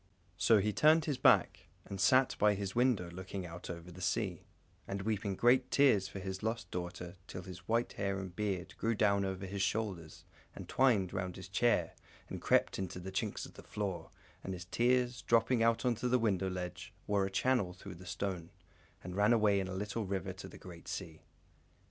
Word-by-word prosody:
So 115 - +5
he 105 +1 +1
turned 155 +5 +5
his 145 -5 -1
back, - - +4 0.2
and 95 -1 -5
sat 130 +6 +4
by 105 0 +4
his 95 -1 -4
window 120 -7 +2
looking 95 +1 -6
out 85 +1 -8
over 85 0 -7
the 90 +2 -11
sea, 95 -1 -1 0.4
and 100 0 -3
weeping 100 -2 -1
great 125 +4 +4
tears 125 -9 +4
for 100 - -8
his 95 0 -5
lost 110 +1 -3
daughter, 90 0 -5
till 95 - -7
his 90 -1 -10
white 115 +1 +1
hair 100 -1 -1
and 95 -2 -6
beard 95 -3 -2
grew 115 0 0
down 100 -1 +3
over 95 0 -3
his 100 +1 -4
shoulders 95 -7 -2 0.3
and - - -8
twined 110 -9 +3
round 90 -2 -3
his 95 -1 -9
chair 120 +5 +2 0.4
and - - -6
crept - - +2
into 95 -1 -4
the 95 +2 -6
chinks 95 - -2
of - - -13
the - - -11
floor, 90 -5 -4 0.3
and 95 - -4
his 90 0 -8
tears, 125 +4 +1
dropping 115 +1 +3
on 115 0 +5
to 125 0 -1
the 125 - +4
window 95 -5 +1
ledge, 90 -1 -5
wore 100 -1 +1
a - - -5
channel 100 -1 +1
through 90 +2 -10
the 90 +1 -12
stone, 90 -3 -3 0.5
and 90 0 -6
ran 105 +3 +4
away 105 -3 +4
in 95 - -2
a 95 - -5
little 105 +2 -3
river 95 -2 -2
to - - -9
the - - -12
great 85 -2 -12
sea. 80 -5 -6
100 Hz, 200 wpm, -34 LUFS, 90-115 Hz, 0.5 s, So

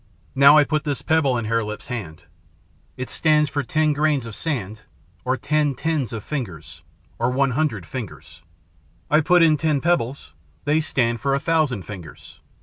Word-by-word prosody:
Now 140 +2 +7
I 150 - +7
put 155 +1 -1
this 145 -3 -3
pebble 150 -6 +2
in 115 - -3
Hare 115 +1 0
Lip's 105 0 -6
hand. 105 - -7 0.7
It 130 - -4
stands 150 -2 +2
for 145 - -1
ten 155 +3 +1
grains 145 -3 +1
of 115 - -8
sand, 110 - -4 0.4
or 130 +1 0
ten 145 +1 0
tens 155 -4 -1
of 110 -3 -6
fingers, 115 - -6 0.4
or 120 - +1
one 135 +1 +1
hundred 125 - -1
fingers. 100 - -8 0.7
I 155 +1 +5
put 175 +2 +4
in 155 -2 +4
ten 155 -2 +1
pebbles. 135 - -1 0.3
They 155 +2 +2
stand 120 -7 0
for 135 +2 +1
a - - 0
thousand 150 - 0
fingers. 90 -7 -11
140 Hz, 170 wpm, -22 LUFS, 115-155 Hz, 0.7 s, Now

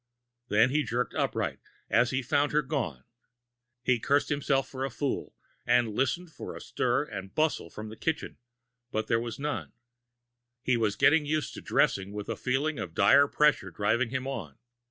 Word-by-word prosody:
Then 110 +3 +4
he 150 +2 +2
jerked 125 -2 -2
upright, - - -1 0.3
as 120 +1 +3
he 130 +1 -1
found 145 +3 +1
her 150 0 +3
gone. 75 - -3 0.8
He 125 -1 +2
cursed 140 +5 +2
himself 140 -2 +1
for 130 0 -5
a 135 - -1
fool, 135 +2 -3 0.3
and 120 -3 +2
listened 135 +9 -1
for - - -8
a - - -7
stir - - 0
and 95 0 -8
bustle 155 - +1
from 105 +5 -8
the 110 - -9
kitchen, 160 +6 -3 0.5
but 110 - -1
there 115 - +2
was 115 -1 -5
none. 145 +1 -3 0.9
He 130 - +2
was 110 -3 +1
getting 150 -1 +4
used 155 0 -1
to - - -8
dressing 100 +1 +1
with 105 -1 -6
a - - -1
feeling 140 +4 -1
of - - -6
dire 140 +1 +6
pressure 150 -10 +2
driving 105 +7 +1
him 130 +1 -3
on. 95 - -5
130 Hz, 175 wpm, -29 LUFS, 110-145 Hz, 0.9 s, dire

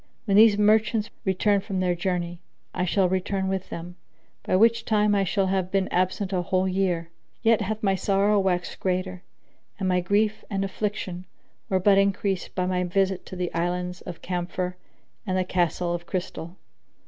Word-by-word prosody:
When 200 -3 +2
these 215 0 +7
merchants 215 +1 +3
return 200 +1 +2
from 195 -2 -3
their 180 -1 +2
journey, 175 -1 -2 0.3
I 180 - -1
shall 185 +1 +2
return 190 +1 -1
with 190 -1 -2
them, 175 +2 -7 0.4
by - - 0
which 230 +3 +4
time 210 -2 +2
I 200 -1 +3
shall 195 +1 +1
have 190 -1 0
been 195 0 +1
absent 185 +2 0
a 180 - +1
whole 185 +2 0
year: 180 -3 -1 0.3
yet 225 -1 +4
hath 215 +2 -3
my 195 -2 +3
sorrow 200 +2 +2
waxed 180 -2 -1
greater 185 -1 -2 0.6
and 195 -3 -2
my 180 -1 +2
grief 205 +4 +1
and 195 -1 -1
affliction 195 -3 -4 0.4
were 190 - +2
but 195 +1 +5
increased 195 -1 0
by 185 - 0
my 180 0 0
visit 190 +1 0
to - - -7
the 180 -1 -3
Islands 180 +1 -2
of 175 -2 -9
Camphor 180 0 -3 0.5
and 185 0 0
the 185 - +2
Castle 175 -1 0
of 175 0 -5
Crystal. 180 -2 -5
190 Hz, 175 wpm, -25 LUFS, 180-200 Hz, 0.6 s, these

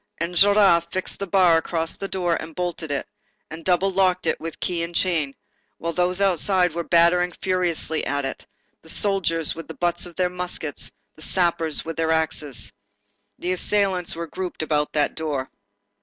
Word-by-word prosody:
Enjolras 180 +1 +5
fixed 185 - -4
the 200 - -3
bar 180 -3 +5
across 165 0 -2
the 195 - -5
door, 175 -3 0
and 160 -1 -9
bolted 175 -3 -3
it, 140 -1 -2 0.4
and 160 +1 -7
double 185 +2 +2
locked 185 -1 +2
it - - 0
with 165 0 -6
key 175 -2 -1
and 170 +1 -5
chain, 160 -7 +1 0.4
while 170 0 -3
those 180 +2 +1
outside 185 -2 +3
were 170 - -2
battering 175 +1 +4
furiously 175 -4 0
at 145 0 0
it, 135 - -5 0.3
the 160 - -16
soldiers 165 -5 +1
with 165 - -9
the - - -8
butts 175 0 0
of 175 - -13
their 180 -1 +2
muskets, 175 -7 -5 0.2
the - - -16
sappers 170 -3 +1
with 165 0 -5
their 165 0 +1
axes. 155 -4 -1 0.6
The 180 - -2
assailants 185 -2 +1
were 170 0 -4
grouped 180 0 -5
about 150 -1 0
that 150 -1 +1
door. 145 -5 -3
170 Hz, 170 wpm, -23 LUFS, 160-185 Hz, 0.6 s, Enjolras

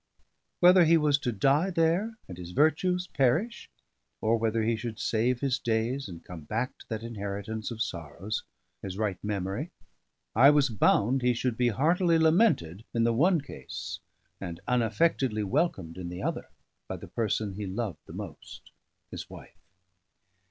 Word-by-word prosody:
Whether 180 0 +7
he 165 +1 +6
was 150 -2 +3
to 125 - -1
die 135 - +2
there 180 +6 +1
and 90 - -8
his 90 0 -8
virtues 180 - +2
perish: 165 - 0 0.5
or 110 +1 +2
whether 115 0 0
he 115 +1 +1
should 110 -1 -5
save 120 +2 0
his 135 -2 0
days 120 +3 -1
and 85 -2 -10
come 90 -2 -8
back 115 +9 -2
to - - -15
that 110 -1 -4
inheritance 105 -1 -4
of 115 -2 -2
sorrows, 85 +5 -5 0.4
his 95 -1 -6
right 100 -4 -2
memory: 105 - -2 0.7
I 130 +5 +8
was 145 -2 +4
bound 115 +3 +3
he 125 0 +2
should 120 0 -1
be 125 +1 +2
heartily 165 - +3
lamented 160 - +3
in 115 - +3
the 115 0 +3
one 165 +7 +3
case, 140 - -7 0.4
and 85 -3 -6
unaffectedly 120 -1 +1
welcomed 95 - -1
in 90 -1 -5
the 90 +1 -6
other, - - -3 0.4
by - - -4
the - - -10
person 110 -2 -1
he 100 +1 -5
loved 100 0 -3
the - - -10
most, - - -9 0.4
his - - -7
wife. - - -13
115 Hz, 160 wpm, -28 LUFS, 105-150 Hz, 0.7 s, I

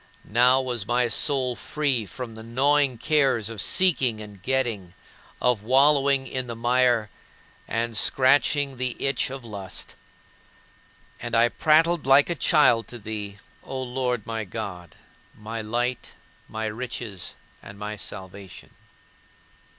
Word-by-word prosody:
Now 125 +4 +4
was 125 -5 -3
my 120 0 +1
soul 130 0 +1
free 135 -6 -1
from 115 +6 -7
the 110 - -10
gnawing 135 +3 +1
cares 130 -4 +1
of 110 -3 -4
seeking 135 - +3
and 105 -3 -11
getting, 115 -7 -2 0.4
of 125 -4 +1
wallowing 135 +3 +3
in 130 -1 -4
the 115 - -5
mire 120 -2 +2 0.6
and 115 0 -2
scratching 135 +4 +2
the 125 -1 -1
itch 135 -1 0
of 135 -2 -8
lust. 100 -4 -6 1.3
And 120 0 -4
I 115 +1 +4
prattled 160 +1 +2
like 140 +5 +5
a - - +2
child 150 -6 +3
to 120 - -9
thee, 105 -2 -6 0.3
O 135 - -6
Lord 125 -3 -2
my 115 -1 -3
God 90 -4 -7 0.4
my 110 +2 -6
light, 120 +3 -3 0.3
my 110 0 -4
riches, 110 -3 -4 0.3
and 100 - -12
my 105 +1 -5
salvation. 95 -1 -8
120 Hz, 130 wpm, -25 LUFS, 110-130 Hz, 1.3 s, like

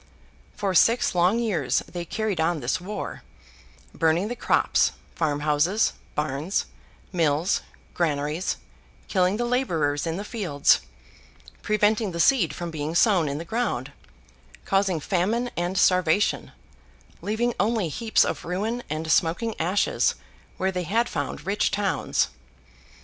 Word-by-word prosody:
For 195 -2 -1
six 230 +6 +4
long 180 +5 +3
years 200 - 0
they 175 -1 -6
carried 210 -2 -2
on 165 0 +1
this 140 +8 -1
war: 205 +4 -5 0.7
burning 165 +5 +1
the 245 - -3
crops, - - +2 0.2
farmhouses, 150 +6 +1 0.2
barns, 150 +5 -1 0.5
mills, 165 +1 +1 0.3
granaries; 155 0 -1 0.5
killing 185 +2 +2
the 240 - -1
labourers 165 - 0
in 165 +1 -2
the 200 - -4
fields; 185 - +2 0.8
preventing 210 -1 +1
the 170 - -4
seed 190 - +4
from 170 0 -5
being 155 +1 -4
sown 180 -6 +4
in 140 - -3
the 165 - -6
ground; 190 - -2 0.7
causing 195 -3 +1
famine 210 - 0
and 175 +2 -2
starvation; 185 +1 +2 0.7
leaving 235 +3 0
only 210 -1 +1
heaps 220 +8 +2
of - - -3
ruin 210 +8 -2
and 155 +1 -2
smoking 175 +9 +2
ashes, 185 +5 +1 0.4
where 190 0 0
they 180 -1 -2
had 225 +7 +1
found 145 0 -4
rich 200 +2 +1
towns. 200 -2 0
180 Hz, 130 wpm, -25 LUFS, 160-210 Hz, 0.8 s, six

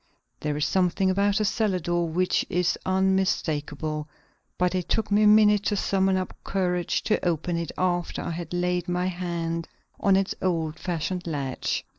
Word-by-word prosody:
There 150 -1 -2
is 150 - +1
something 185 +3 +2
about 200 +2 +2
a 215 - +1
cellar 205 -2 +1
door 175 0 -1
which 180 +3 +1
is 180 0 +1
unmistakable, 155 -5 0 0.5
but 180 0 +1
it 180 -2 -2
took 220 -2 0
me 205 +1 +4
a 210 - +6
minute 210 -1 +6
to 205 - +1
summon 190 -1 +1
up 185 - -3
courage 180 -3 -1
to 215 - 0
open 175 0 0
it 170 -1 -3
after 175 -1 -1
I - - -3
had 170 -1 -6
laid 180 0 -1
my 180 0 0
hand 170 -2 -3 0.3
on 195 -1 +4
its 195 0 +1
old 165 -3 -1
fashioned 175 +1 -3
latch. 140 -5 -2
180 Hz, 170 wpm, -26 LUFS, 165-190 Hz, 0.5 s, a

